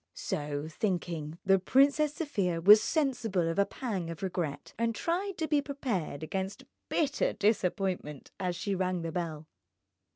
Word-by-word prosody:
So 145 0 -3
thinking, 170 -4 -2
the 195 0 +5
Princess 280 +8 +3
Sofia 195 - -1
was 205 +5 +8
sensible 240 - 0
of 165 +4 -1
a 200 - +4
pang 195 -10 -3
of 165 +2 -7
regret, 170 -6 -3
and 230 -1 +1
tried 365 - -1
to 320 - -1
be 295 -2 +3
prepared 235 - -3
against 190 +3 -3 0.3
bitter 290 -3 +1
disappointment 190 -7 -1
as 180 -2 -1
she 200 +3 -2
rang 185 -2 -1
the 165 - -3
bell. 160 -3 -4
190 Hz, 150 wpm, -30 LUFS, 170-250 Hz, 0.3 s, was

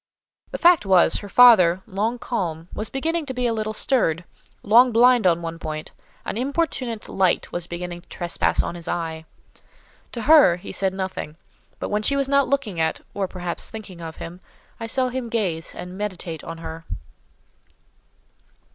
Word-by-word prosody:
The - - -5
fact 345 -5 +5
was—her 190 +1 +3
father, 190 -7 +6
long 220 +3 -2
calm, 170 -9 -4
was 215 - -3
beginning 320 +3 -2
to 260 - -5
be 250 0 -1
a 235 - +1
little 215 -1 -2
stirred: 210 - +1 0.4
long 240 +4 +6
blind 240 -2 +5
on 170 -1 +2
one 165 0 -5
point, 155 -2 -6 0.3
an - - -3
importunate 260 -4 -2
light 190 -2 +1
was 175 -1 -4
beginning 175 0 -6
to 175 - -31
trespass 175 -1 0
on - - -4
his 170 -1 -9
eye. 160 -1 -3 0.9
To 235 - -4
her, 295 - +7
he 175 - -9
said 190 -1 -1
nothing; 185 -5 -5 0.4
but - - -4
when 210 +1 0
she 280 +6 +1
was 275 -1 +1
not 280 0 +3
looking 235 -11 -1
at, 160 0 0
or 195 -1 -2
perhaps 180 -2 -4
thinking 200 -6 -9
of 160 -1 -7
him, 175 +2 -9 0.4
I 230 - -4
saw 255 +2 0
him 250 -2 -4
gaze 180 -8 -2
and 180 +1 -8
meditate 180 -5 -5
on 165 0 -7
her. 165 0 -8
195 Hz, 170 wpm, -23 LUFS, 170-245 Hz, 0.9 s, her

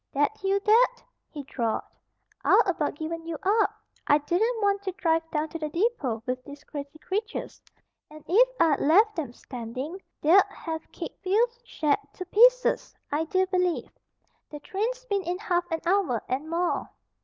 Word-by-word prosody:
"That 290 +10 0
you, 390 +1 +2
Dad?" 480 +4 +4 0.3
he 290 -3 -7
drawled. 235 -4 -2 0.6
"I'd - - +6
about 335 -7 -1
given 330 +2 -5
you 330 -2 -3
up. 425 +3 +3 0.4
I 290 - +6
didn't 400 +11 0
want 400 -1 +2
to 390 -1 -3
drive 330 -2 +1
down 310 0 -1
to 330 - -6
the 305 -1 -3
depot 305 - -1
with 255 0 -3
these 285 +2 -11
crazy 285 0 -8
creatures. 420 +8 -4 0.5
And 305 0 -13
if 480 +8 +5
I'd 315 -4 +4
left 395 +6 +4
'em 280 -7 -4
standing 255 +9 -7 0.2
they'd 345 +6 +6
have 320 -1 -6
kicked - - -8
Phil's 465 +5 +1
shed 305 -10 0
to 365 - -7
pieces, - - +4 0.2
I 305 +3 0
do 375 +3 +2
believe. 360 -2 0 0.6
The 295 - -8
train's 475 +9 -3
been 405 -4 0
in 355 0 -3
half 355 -4 -1
an 325 0 -2
hour 350 - +1
and 275 +5 -2
more." 345 +2 -1
345 Hz, 165 wpm, -27 LUFS, 300-405 Hz, 0.6 s, I'd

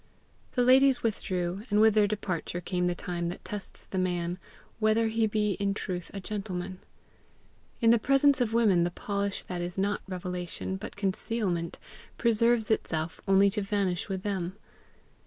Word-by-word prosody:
The 250 - +2
ladies 260 +1 +5
withdrew, 185 -4 -1
and 205 0 +3
with 220 0 +6
their 210 -1 +4
departure 185 -4 -3
came 180 0 -1
the 175 - 0
time 175 -1 -3
that 175 - -8
tests 205 -2 -7
the 190 - -3
man 175 -1 -1 0.4
whether 220 +1 +3
he 225 0 +2
be 210 -1 +1
in 200 0 0
truth 180 -4 -4
a 200 - -5
gentleman. 185 -2 -4 1.0
In 230 -1 +6
the 235 - +5
presence 275 +2 +4
of 230 -3 +1
women 215 -7 +4
the 175 - +1
polish 200 +2 -2
that 180 -1 -4
is 175 +1 -4
not 200 +1 0
revelation 180 0 -4
but 195 +3 -7
concealment 190 -3 -1 0.4
preserves 230 -1 +2
itself 160 -6 -1
only 195 +1 +5
to 210 +1 -1
vanish 195 -2 -1
with 190 -1 -3
them. 190 -2 -2
200 Hz, 160 wpm, -29 LUFS, 180-220 Hz, 1.0 s, with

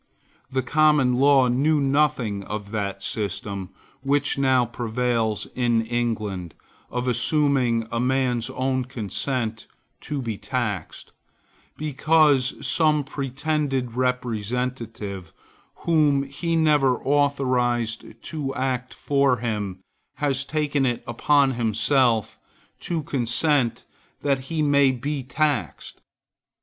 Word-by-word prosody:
The 130 0 0
Common 150 -1 +3
Law 135 -2 +5
knew 145 +5 +2
nothing 135 -7 +1
of 105 -1 -6
that 100 -2 -3
system, 100 -2 -3 0.3
which 140 +1 +1
now 130 -2 +3
prevails 115 -2 -1
in 120 -2 +1
England, 110 -7 -2 0.3
of 125 +1 -3
assuming 125 -2 +2
a 115 - -1
man's 125 -1 0
own 130 0 -1
consent 115 -1 -3 0.3
to 145 - -4
be 115 -5 -4
taxed, 105 -4 -4 0.7
because 150 -2 +2
some 155 -2 +2
pretended 140 -2 -2
representative, 115 -5 -3 0.5
whom 150 -4 +3
he 155 +5 -3
never 150 -5 +3
authorized 130 -5 +1 0.2
to 140 -4 -4
act 130 -2 -2
for 140 -3 +2
him, 105 -5 -3 0.3
has 140 -2 0
taken 150 -2 0
it 120 -3 0
upon 135 +3 +3
himself 120 0 +1 0.4
to 165 -3 -3
consent 135 0 0 0.4
that 140 -2 +2
he 160 -2 0
may 140 -2 +4
be 140 +3 -2
taxed. 130 - -2
130 Hz, 105 wpm, -24 LUFS, 115-140 Hz, 0.7 s, Law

